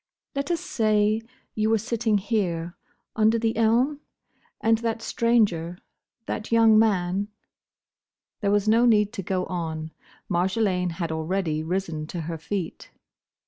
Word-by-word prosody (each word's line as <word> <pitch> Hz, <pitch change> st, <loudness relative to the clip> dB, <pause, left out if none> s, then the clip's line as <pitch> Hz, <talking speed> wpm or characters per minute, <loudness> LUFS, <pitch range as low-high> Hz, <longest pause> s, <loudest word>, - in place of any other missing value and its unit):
"Let 280 Hz, +2 st, -3 dB
us 340 Hz, -2 st, 0 dB
say, 215 Hz, -1 st, +1 dB, 0.3 s
you 215 Hz, 0 st, 0 dB
were 225 Hz, -, +4 dB
sitting 225 Hz, 0 st, 0 dB
here, 185 Hz, -5 st, -2 dB, 0.4 s
under 220 Hz, +1 st, +3 dB
the 225 Hz, 0 st, 0 dB
elm? 235 Hz, +6 st, +2 dB, 0.6 s
And 225 Hz, 0 st, +2 dB
that 230 Hz, -1 st, -2 dB
stranger, 210 Hz, -9 st, +1 dB, 0.5 s
that 215 Hz, +1 st, -5 dB
young 225 Hz, -1 st, +6 dB
man—" 195 Hz, -2 st, +1 dB, 1.1 s
There 200 Hz, -, 0 dB
was 205 Hz, +1 st, +2 dB
no 230 Hz, +3 st, +5 dB
need 210 Hz, -2 st, +3 dB
to 210 Hz, -, -4 dB
go 185 Hz, 0 st, -1 dB
on. 160 Hz, -3 st, -4 dB, 0.4 s
Marjolaine 180 Hz, 0 st, 0 dB
had 165 Hz, -1 st, -3 dB
already 160 Hz, 0 st, -1 dB
risen 165 Hz, -2 st, -3 dB
to 170 Hz, +1 st, -5 dB
her 165 Hz, 0 st, -5 dB
feet. 180 Hz, +1 st, -5 dB
205 Hz, 135 wpm, -25 LUFS, 175-225 Hz, 1.1 s, young